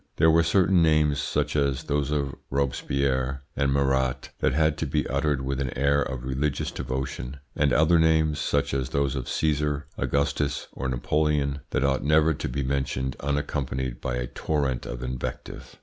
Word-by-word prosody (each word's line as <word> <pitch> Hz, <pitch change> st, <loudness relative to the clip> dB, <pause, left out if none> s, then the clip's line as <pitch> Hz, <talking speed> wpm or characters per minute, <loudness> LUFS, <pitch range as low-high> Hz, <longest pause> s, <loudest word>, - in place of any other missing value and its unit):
There 80 Hz, +1 st, +5 dB
were 85 Hz, +1 st, +5 dB
certain 90 Hz, +2 st, +3 dB
names, 75 Hz, -3 st, +3 dB
such 75 Hz, +1 st, -1 dB
as 70 Hz, -1 st, +1 dB
those 75 Hz, -2 st, -1 dB
of 70 Hz, -2 st, -1 dB, 0.2 s
Robespierre 70 Hz, 0 st, -1 dB
and 70 Hz, 0 st, +1 dB
Marat, 65 Hz, -2 st, +1 dB
that -, -, +2 dB
had 75 Hz, +2 st, +2 dB
to -, -, -1 dB
be -, -, 0 dB
uttered 70 Hz, 0 st, 0 dB
with 70 Hz, 0 st, -2 dB
an 65 Hz, -, -1 dB
air 70 Hz, +1 st, +3 dB
of 65 Hz, -2 st, -3 dB
religious 70 Hz, +3 st, -1 dB
devotion, 65 Hz, 0 st, -4 dB, 0.2 s
and 75 Hz, -2 st, +2 dB
other 80 Hz, +5 st, +4 dB
names, 80 Hz, -2 st, +3 dB
such 75 Hz, -, 0 dB
as 65 Hz, -2 st, -1 dB
those 70 Hz, +1 st, 0 dB
of 65 Hz, -3 st, -4 dB
Caesar, 75 Hz, -1 st, 0 dB
Augustus, 70 Hz, 0 st, 0 dB
or 70 Hz, -, -4 dB
Napoleon, 70 Hz, +2 st, 0 dB
that -, -, 0 dB
ought 70 Hz, -1 st, +1 dB
never 75 Hz, +2 st, +4 dB
to -, -, -4 dB
be 70 Hz, +3 st, -2 dB
mentioned 65 Hz, -1 st, -1 dB
unaccompanied 70 Hz, -3 st, -2 dB
by 60 Hz, -, -2 dB
a -, -, -2 dB
torrent 65 Hz, -2 st, -2 dB
of -, -, -5 dB
invective. 65 Hz, -1 st, -6 dB
70 Hz, 170 wpm, -26 LUFS, 65-75 Hz, 0.2 s, There